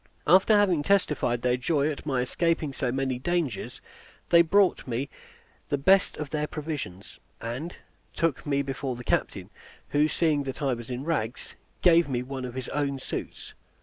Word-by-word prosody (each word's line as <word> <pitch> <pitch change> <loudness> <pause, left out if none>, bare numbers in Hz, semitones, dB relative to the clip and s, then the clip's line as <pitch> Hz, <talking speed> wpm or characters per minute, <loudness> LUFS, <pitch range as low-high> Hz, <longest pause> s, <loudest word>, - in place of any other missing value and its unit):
After 190 +6 +6
having 185 -7 +3
testified 150 -9 +1
their 125 0 +2
joy 145 +3 +1
at 150 - -8
my 130 -3 +1
escaping 160 +2 0
so 125 -2 -1
many 130 -1 -1
dangers, 165 - -2 0.5
they 170 - +7
brought 185 +1 +3
me 125 +3 -3 0.6
the 145 - +1
best 190 +8 +3
of 150 -2 -5
their 150 -1 -1
provisions; 145 - -6 0.2
and 130 +10 -5 0.4
took 165 -6 -1
me 140 -1 0
before 135 -1 -3
the 125 - -8
captain, - - -1 0.4
who, 150 +1 +3
seeing 155 -2 +1
that 135 -1 -5
I 135 -3 +1
was 120 -1 -7
in 125 +1 -4
rags, 140 -7 -3 0.3
gave 170 -3 +5
me 125 -2 -1
one 130 0 -5
of 125 -1 -7
his 130 -1 -4
own 140 -1 -1
suits. 130 - -6
140 Hz, 170 wpm, -27 LUFS, 125-165 Hz, 0.6 s, they